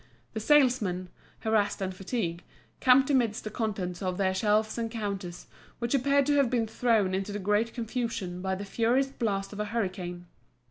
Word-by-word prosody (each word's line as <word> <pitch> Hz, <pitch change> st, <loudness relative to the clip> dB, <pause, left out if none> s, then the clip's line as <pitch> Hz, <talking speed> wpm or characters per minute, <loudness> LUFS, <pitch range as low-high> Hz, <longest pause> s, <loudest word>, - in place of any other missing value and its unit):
The 220 Hz, -, -2 dB
salesmen, 220 Hz, -9 st, +3 dB, 0.3 s
harassed 220 Hz, -2 st, +1 dB
and 190 Hz, -1 st, -2 dB
fatigued, 185 Hz, -3 st, -3 dB, 0.4 s
camped 265 Hz, +2 st, +5 dB
amidst 240 Hz, -4 st, +1 dB
the 215 Hz, -, -5 dB
contents 195 Hz, -6 st, -3 dB
of 185 Hz, -2 st, -2 dB
their 190 Hz, -1 st, +1 dB
shelves 215 Hz, +3 st, +1 dB
and 230 Hz, -1 st, -1 dB
counters, 200 Hz, -6 st, -5 dB, 0.3 s
which 235 Hz, +1 st, -2 dB
appeared 280 Hz, +1 st, +3 dB
to 290 Hz, +1 st, +2 dB
have 275 Hz, -4 st, +4 dB
been 235 Hz, -2 st, +1 dB
thrown 220 Hz, -4 st, +1 dB
into 195 Hz, +2 st, -2 dB
the 205 Hz, -, -3 dB
greatest 210 Hz, +3 st, 0 dB
confusion 225 Hz, -7 st, -3 dB
by 190 Hz, 0 st, -1 dB
the 200 Hz, +2 st, -6 dB
furious 240 Hz, +6 st, +1 dB
blast 200 Hz, -6 st, -2 dB
of 205 Hz, -, -8 dB
a 210 Hz, -, 0 dB
hurricane. 185 Hz, -5 st, -3 dB
215 Hz, 175 wpm, -28 LUFS, 190-235 Hz, 0.4 s, camped